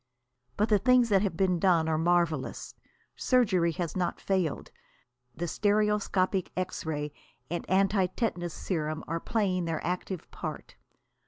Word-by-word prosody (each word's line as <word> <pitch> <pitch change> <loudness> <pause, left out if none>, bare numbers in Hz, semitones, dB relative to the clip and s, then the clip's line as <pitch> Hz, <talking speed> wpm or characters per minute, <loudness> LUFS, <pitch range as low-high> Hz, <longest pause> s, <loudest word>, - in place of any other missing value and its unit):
But 210 +2 +2
the 210 -2 +4
things 250 +2 +4
that 195 -2 +4
have 195 -5 -1
been 185 -2 +2
done 170 -3 +3
are 160 - +1
marvellous. 170 -4 0 0.4
Surgery 190 -10 +2
has 170 0 -3
not 180 -2 -1
failed. 185 -6 -1 0.6
The 175 +2 -3
stereoscopic 205 -2 +1
X 185 -3 -3
ray 150 -2 -3 0.4
and 175 - -3
antitetanus 190 -1 +1
serum 155 -3 -3
are 165 +1 -2
playing 185 -4 0
their 165 -1 -2
active 180 0 -4
part. - - -7
185 Hz, 135 wpm, -29 LUFS, 165-200 Hz, 0.6 s, the